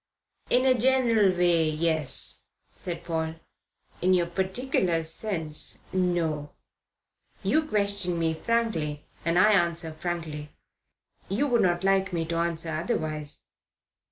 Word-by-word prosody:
"In 250 Hz, +1 st, +3 dB
a 260 Hz, -, +6 dB
general 240 Hz, -5 st, +3 dB
way, 170 Hz, -3 st, +3 dB
yes," 155 Hz, -2 st, 0 dB, 0.3 s
said 175 Hz, -3 st, -5 dB
Paul. 160 Hz, -1 st, -2 dB, 0.7 s
"In 185 Hz, +1 st, +4 dB
your 175 Hz, -1 st, +2 dB
particular 190 Hz, -1 st, 0 dB
sense, 160 Hz, -3 st, -3 dB
no. 170 Hz, -5 st, 0 dB, 0.9 s
You 310 Hz, -, +3 dB
question 200 Hz, -, +1 dB
me 165 Hz, -1 st, +1 dB
frankly 160 Hz, -7 st, -1 dB, 0.2 s
and 165 Hz, +1 st, +1 dB
I 210 Hz, +4 st, +6 dB
answer 170 Hz, -4 st, +1 dB
frankly. 155 Hz, -3 st, -4 dB, 0.8 s
You 215 Hz, +10 st, +1 dB
would 245 Hz, -5 st, +3 dB
not 175 Hz, 0 st, +2 dB
like 195 Hz, -1 st, +2 dB
me 165 Hz, -1 st, 0 dB
to 165 Hz, +1 st, -2 dB
answer 170 Hz, -1 st, -1 dB
otherwise." 155 Hz, -4 st, -3 dB
175 Hz, 120 wpm, -27 LUFS, 160-200 Hz, 0.9 s, a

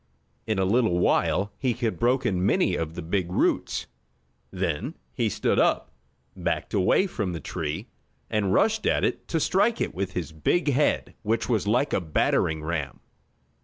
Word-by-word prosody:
In 110 Hz, -2 st, 0 dB
a 95 Hz, -, +2 dB
little 110 Hz, -2 st, +2 dB
while 100 Hz, +3 st, +2 dB
he 130 Hz, -3 st, +1 dB
had 115 Hz, -2 st, -2 dB
broken 120 Hz, -6 st, +1 dB
many 95 Hz, -1 st, +2 dB
of 80 Hz, -1 st, -3 dB
the 90 Hz, -, -5 dB
big 90 Hz, +1 st, -1 dB
roots. -, -, 0 dB, 0.6 s
Then 85 Hz, -4 st, -2 dB, 0.2 s
he -, -, 0 dB
stood -, -, +1 dB
up, 70 Hz, -, +2 dB, 0.4 s
backed -, -, -2 dB
away 100 Hz, -, +3 dB
from 105 Hz, -, -3 dB
the 85 Hz, -, -4 dB
tree, 80 Hz, -3 st, -4 dB, 0.4 s
and 100 Hz, 0 st, 0 dB
rushed 220 Hz, -, +2 dB
at -, -, +2 dB
it -, -, -1 dB
to 165 Hz, -, 0 dB
strike 205 Hz, +8 st, +2 dB
it -, -, -1 dB
with 95 Hz, +1 st, -3 dB
his 85 Hz, -6 st, -3 dB
big 145 Hz, -, +1 dB
head 145 Hz, +4 st, +1 dB
which 115 Hz, +1 st, 0 dB
was 110 Hz, -6 st, 0 dB
like 125 Hz, +7 st, +2 dB
a -, -, +2 dB
battering 80 Hz, -1 st, +1 dB
ram. 80 Hz, -3 st, -3 dB
100 Hz, 165 wpm, -26 LUFS, 85-120 Hz, 0.6 s, away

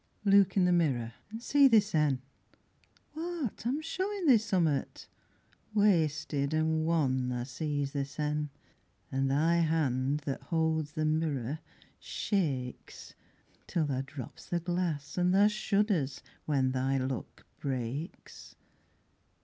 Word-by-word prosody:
Look 200 Hz, -1 st, +5 dB
in 185 Hz, -, +5 dB
the 180 Hz, -, +3 dB
mirror 130 Hz, -10 st, +1 dB, 0.2 s
an' 225 Hz, +1 st, -6 dB
see 280 Hz, +2 st, +5 dB
thy 230 Hz, -4 st, +6 dB
sen, 150 Hz, -11 st, +2 dB, 0.9 s
What, 315 Hz, -, -4 dB
I -, -, +2 dB
am 285 Hz, +5 st, -1 dB
showin' 380 Hz, +3 st, -2 dB
thee 255 Hz, -7 st, +7 dB
summat. 180 Hz, -9 st, 0 dB, 0.7 s
Wasted 155 Hz, -7 st, +2 dB
an' 160 Hz, 0 st, +1 dB
wan 130 Hz, -6 st, +1 dB
tha 120 Hz, -1 st, -2 dB
sees 145 Hz, 0 st, -2 dB
thy 140 Hz, -, -1 dB
sen, 150 Hz, +1 st, -2 dB, 0.6 s
An' 135 Hz, +1 st, +1 dB
thy 155 Hz, +5 st, +3 dB
hand 150 Hz, -4 st, +1 dB
that 140 Hz, -1 st, -4 dB
holds 160 Hz, -2 st, 0 dB
the 155 Hz, -, -1 dB
mirror 155 Hz, -3 st, -1 dB, 0.4 s
shakes 140 Hz, -, -3 dB, 0.5 s
Till 165 Hz, -3 st, 0 dB
tha 135 Hz, -3 st, -1 dB
drops 135 Hz, -2 st, -9 dB
the 175 Hz, -, 0 dB
glass 175 Hz, -3 st, -2 dB
and 180 Hz, +1 st, +3 dB
tha 200 Hz, +1 st, +6 dB
shudders 205 Hz, -8 st, 0 dB, 0.2 s
when 135 Hz, -3 st, +2 dB
Thy 130 Hz, +1 st, 0 dB
luck 130 Hz, -1 st, -4 dB
breaks. 135 Hz, -, -5 dB
155 Hz, 125 wpm, -31 LUFS, 135-185 Hz, 0.9 s, thee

